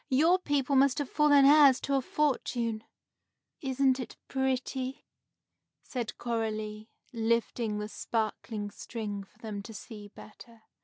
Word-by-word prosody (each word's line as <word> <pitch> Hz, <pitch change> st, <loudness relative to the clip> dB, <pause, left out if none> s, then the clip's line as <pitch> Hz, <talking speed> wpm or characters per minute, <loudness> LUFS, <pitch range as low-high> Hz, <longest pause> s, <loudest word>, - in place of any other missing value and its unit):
Your 320 Hz, +7 st, +4 dB
people 285 Hz, -5 st, 0 dB
must 270 Hz, 0 st, +4 dB
have 290 Hz, -3 st, -3 dB
fallen 290 Hz, -2 st, +5 dB
heirs 285 Hz, -2 st, +7 dB
to 280 Hz, -, -2 dB
a 270 Hz, -, +3 dB
fortune!" 240 Hz, -6 st, -1 dB, 0.8 s
"Isn't 265 Hz, -1 st, +2 dB
it 250 Hz, -, -7 dB
pretty!" 265 Hz, 0 st, -2 dB, 0.8 s
said 240 Hz, -4 st, -5 dB
Coralie, 215 Hz, -2 st, -3 dB, 0.2 s
lifting 230 Hz, -1 st, 0 dB
the 210 Hz, 0 st, -3 dB
sparkling 215 Hz, -1 st, -3 dB
string 205 Hz, -4 st, -5 dB
for 195 Hz, -, -24 dB
them 210 Hz, -3 st, -6 dB
to 225 Hz, +2 st, -10 dB
see 210 Hz, -1 st, -9 dB
better. 220 Hz, +2 st, -15 dB
240 Hz, 125 wpm, -30 LUFS, 215-275 Hz, 0.8 s, heirs